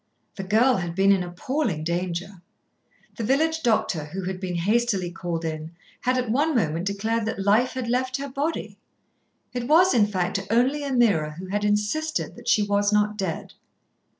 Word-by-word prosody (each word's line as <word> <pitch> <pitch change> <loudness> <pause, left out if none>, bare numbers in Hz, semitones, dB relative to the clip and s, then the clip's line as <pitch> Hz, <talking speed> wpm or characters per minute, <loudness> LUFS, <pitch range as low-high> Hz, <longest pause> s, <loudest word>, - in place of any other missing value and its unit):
The 195 - -5
girl 230 +6 +3
had 175 -2 -4
been 195 +1 +4
in 195 -2 +3
appalling 180 - -2
danger. 175 +2 -3 0.8
The 230 - -3
village 320 +7 +1
doctor, 215 - +1
who 185 +5 -6
had 185 0 -4
been 180 -2 -3
hastily 200 0 +1
called 170 -2 -4
in, 160 +1 -5 0.3
had 255 +1 +1
at 250 -3 -1
one 295 +5 +1
moment 165 -5 0
declared 220 +3 -1
that 205 -3 -3
life 220 +5 +3
had 255 -2 -4
left 255 +2 0
her 280 0 -5
body. 285 +4 -3 0.7
It 245 -1 -3
was, 345 +5 +5
in 215 -4 +4
fact, 185 -2 -1
only 250 +6 +2
Ameerah 210 - +2
who 185 - -7
had 205 +1 -1
insisted 210 +10 -1
that - - -13
she 210 - +4
was 205 0 +1
not 210 0 +2
dead. 190 -5 -4
210 Hz, 175 wpm, -24 LUFS, 180-250 Hz, 0.8 s, was